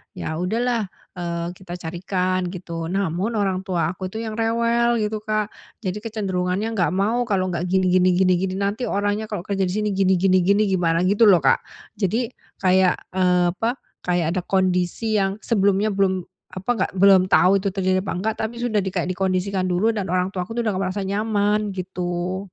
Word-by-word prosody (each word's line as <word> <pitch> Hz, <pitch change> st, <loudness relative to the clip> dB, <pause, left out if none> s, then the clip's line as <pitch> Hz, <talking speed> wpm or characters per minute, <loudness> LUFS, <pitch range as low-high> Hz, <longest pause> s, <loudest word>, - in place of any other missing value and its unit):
Ya 160 Hz, +1 st, -4 dB
udahlah, 230 Hz, +3 st, 0 dB, 0.3 s
eee, 170 Hz, 0 st, -3 dB
kita 180 Hz, -1 st, -9 dB
carikan 180 Hz, +1 st, -2 dB
gitu, 170 Hz, -2 st, -5 dB
namun 195 Hz, +4 st, -1 dB
orang 195 Hz, -3 st, 0 dB
tua 175 Hz, -4 st, -1 dB
aku 185 Hz, 0 st, -6 dB
itu 220 Hz, +4 st, -5 dB
yang 220 Hz, 0 st, -5 dB
rewel 235 Hz, +1 st, +2 dB
gitu, 215 Hz, 0 st, -2 dB
Kak. 215 Hz, -1 st, -2 dB, 0.3 s
Jadi 190 Hz, +2 st, -2 dB
kecenderungannya 200 Hz, -1 st, -2 dB
nggak 185 Hz, -3 st, 0 dB
mau 230 Hz, +5 st, +1 dB
kalau 185 Hz, -3 st, 0 dB
nggak 170 Hz, +1 st, -2 dB
gini 185 Hz, 0 st, +2 dB
gini 185 Hz, 0 st, +4 dB
gini 185 Hz, 0 st, +4 dB
gini, 190 Hz, 0 st, -2 dB
nanti 200 Hz, +5 st, -1 dB
orangnya 205 Hz, +2 st, -1 dB
kalau 205 Hz, -5 st, -4 dB
kerja 195 Hz, -2 st, -1 dB
di -, -, -2 dB
sini 210 Hz, -1 st, 0 dB
gini 190 Hz, -1 st, +3 dB
gini 185 Hz, +1 st, +3 dB
gini 200 Hz, +4 st, +3 dB
gimana, 175 Hz, -3 st, +1 dB
gitu, 205 Hz, +4 st, +4 dB
loh, 175 Hz, -7 st, +6 dB
Kak. 135 Hz, -, +4 dB, 0.4 s
Jadi 225 Hz, +5 st, 0 dB, 0.2 s
kayak, 185 Hz, -1 st, +2 dB
eee, 180 Hz, -1 st, +2 dB
apa, 230 Hz, +7 st, -1 dB, 0.2 s
kayak 175 Hz, -2 st, 0 dB
ada -, -, -4 dB
kondisi 190 Hz, +3 st, +1 dB
yang 195 Hz, 0 st, 0 dB
sebelumnya 205 Hz, -1 st, +2 dB
belum, 190 Hz, -2 st, +1 dB, 0.3 s
apa, 190 Hz, +5 st, -7 dB
nggak 240 Hz, -, 0 dB
belum 190 Hz, -1 st, +6 dB
tahu 195 Hz, +1 st, +5 dB
itu 200 Hz, -, -3 dB
terjadi 185 Hz, -1 st, +1 dB
apa 195 Hz, -, -3 dB
enggak, 215 Hz, +4 st, -1 dB
tapi 235 Hz, +2 st, -3 dB
sudah 220 Hz, -4 st, +1 dB
kayak 185 Hz, -1 st, -2 dB
dikondisikan 185 Hz, 0 st, -1 dB
dulu 185 Hz, +6 st, +2 dB
dan 205 Hz, -4 st, -3 dB
orang 185 Hz, +2 st, 0 dB
tuaku 185 Hz, +4 st, -5 dB
udah 230 Hz, -3 st, 0 dB
nggak 185 Hz, -, -3 dB
merasa 195 Hz, +1 st, -3 dB
nyaman, 210 Hz, 0 st, 0 dB
gitu. 180 Hz, 0 st, -3 dB
190 Hz, 185 wpm, -22 LUFS, 180-210 Hz, 0.4 s, loh